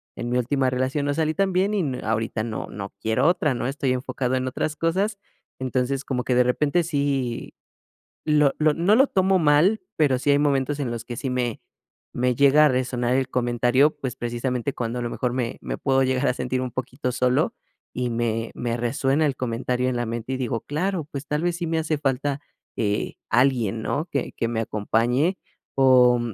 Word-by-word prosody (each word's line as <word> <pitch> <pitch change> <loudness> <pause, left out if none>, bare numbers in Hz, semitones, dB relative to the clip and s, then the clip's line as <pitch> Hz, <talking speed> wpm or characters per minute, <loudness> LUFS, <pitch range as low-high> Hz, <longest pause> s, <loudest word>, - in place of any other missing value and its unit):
en 120 - -4
mi 125 - +1
última 130 +2 +1
relación 130 +3 -1
no 145 - +1
salí 155 0 +1
tan 195 -1 +1
bien, 195 +3 +2
y - - +1
n 135 -6 -3
ahorita 110 0 -1
no 110 -1 -4
no 100 -1 -7
quiero 110 +7 +2
otra, 160 -5 +2
¿no? 120 - -3
Estoy 135 -1 0
enfocado 130 0 -2
en 130 0 -1
otras 150 +4 -2
cosas. 190 +7 0 0.4
Entonces, 130 +1 -1
como 125 -2 -2
que 125 - 0
de 125 - +5
repente 145 +7 +1
sí 140 -6 -2 0.7
lo 150 -2 +4
lo 155 -1 +4
no 185 +6 +3
lo 270 +3 +5
tomo 190 0 +2
mal, 165 +7 +4 0.2
pero, 140 -5 +3
sí 145 - -1
hay 140 - +5
momentos 145 0 +1
en 130 -4 -2
los 115 -1 -4
que 120 - -6
sí 135 - -3
me 125 -3 -2 0.5
me 125 0 +1
llega 140 +3 +6
a - - +5
resonar 125 -1 0
el 130 -1 +1
comentario, 125 +3 +3
pues 130 -5 -4
precisamente, 120 +2 -2
cuando 120 +1 -3
a - - -3
lo 120 - -2
mejor 125 -1 -2
me 125 -2 -2
me 60 -2 -4
puedo 135 0 +2
llegar 130 -1 +1
a - - +2
sentir 130 0 -2
un 130 - -2
poquito 130 +1 -3
solo, 125 0 +1 0.4
y 125 -1 -2
me 115 -1 -1
me 120 -1 -2
resuena 135 +5 +1
el 135 - -1
comentario 125 +1 -1
en 125 - -2
la 120 - -1
mente, 120 +3 -4
y - - -1
digo: 120 -3 -2
"Claro, 175 +2 -2
pues 140 0 -5
tal 150 +1 -1
vez 175 -1 0
sí 175 - -3
me 160 0 0
hace 155 -1 -1
falta, 140 0 -1 0.4
eh, 105 -2 -1 0.2
alguien, 120 -5 +2
¿no? 150 - -1
Que 140 - -2
que 115 - -2
me 115 -1 -1
acompañe". 120 - +1 0.4
O 125 -2 +5
130 Hz, 205 wpm, -24 LUFS, 120-145 Hz, 0.7 s, llega